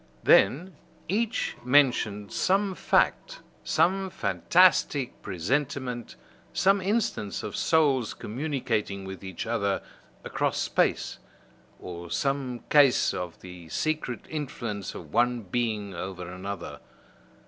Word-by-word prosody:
Then, 180 +7 +4 0.3
each 220 +5 -1
mentioned 120 -6 +2
some 195 +1 +1
fact, - - +1 0.2
some 190 +4 +2
fantastic 130 - +2
presentiment 125 - -2 0.4
some 195 +1 +3
instance 195 - -1
of 105 - -5
souls 140 -8 +2
communicating 115 -6 -2
with 95 0 -8
each 95 -3 -5
other 100 -4 0 0.4
across - - -1
space, - - 0 0.6
or 85 -1 -8
some 135 +2 -1
case 145 -4 +5
of 90 -2 -5
the 90 -2 -11
secret 155 - -2
influence 120 -10 -5
of 80 -4 -10
one 120 0 +2
being 105 -1 -2
over 90 0 -6
another. 95 +3 -6
120 Hz, 105 wpm, -27 LUFS, 100-155 Hz, 0.6 s, case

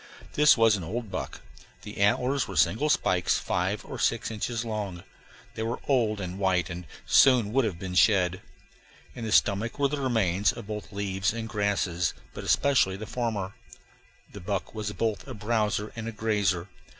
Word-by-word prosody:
This 150 -2 +6
was 115 -2 +5
an 95 - -5
old 110 +5 -5
buck. 95 - -5 0.4
The - - -8
antlers 125 +6 +2
were - - -7
single 145 +9 +2
spikes, 90 - +2
five - - -2
or - - -7
six - - 0
inches 115 +2 -3
long; 105 -6 -4 0.5
they - - -6
were 115 +2 -2
old 115 -6 +2
and 90 0 -5
white 90 -2 +1
and 85 +1 -6
would - - -20 0.2
soon 125 -6 +5
have 105 -7 -2
been 90 0 -6
shed. 95 -3 +3 0.7
In 120 - -6
the 110 - -3
stomach 105 +4 +2
were 140 -1 +2
the 145 0 -3
remains 105 -6 +2
of 115 -3 -9
both 105 0 -6
leaves 100 0 -1
and 115 -1 -4
grasses, 100 -5 0 0.2
but - - -7
especially 130 -9 +2
the 110 - -6
former; 105 -5 -3 0.8
the - - -8
buck 100 +1 -3
was 105 -2 -3
both 110 +4 -2
a 130 - -7
browser 105 -1 -1
and 115 -1 -6
grazer. 105 -5 0
105 Hz, 175 wpm, -27 LUFS, 95-115 Hz, 0.8 s, This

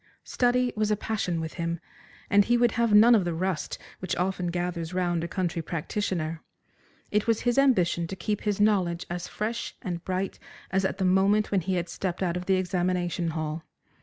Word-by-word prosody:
Study 250 0 +1
was 215 0 +1
a 210 - +3
passion 195 -6 -2
with 160 -1 -4
him, 170 0 -2 0.5
and 205 0 +5
he 240 - +3
would 240 -1 +4
have 235 -2 +1
none 220 +4 +8
of 215 -5 +5
the 175 -1 -2
rust 185 0 -2 0.2
which 185 - -2
often 180 0 -1
gathers 175 0 -3
round 175 -2 0
a - - -2
country 175 -2 -2
practitioner. 165 -1 -3 0.7
It 210 +1 +1
was 225 -1 +2
his 245 +2 +2
ambition 180 -11 +3
to 190 - -5
keep 210 +2 -2
his 205 -2 -1
knowledge 185 -5 +2
as 175 0 -4
fresh 225 +2 -3
and 175 -6 -5
bright 185 +1 -2 0.3
as 190 0 +1
at 190 - -1
the 190 - 0
moment 195 +3 +3
when 195 -2 +2
he 190 +2 -1
had 175 -1 -1
stepped 185 +1 -3
out 175 -2 0
of 180 0 -4
the 190 - +4
examination 180 -1 0
hall. 155 0 -3
185 Hz, 195 wpm, -27 LUFS, 170-210 Hz, 0.7 s, none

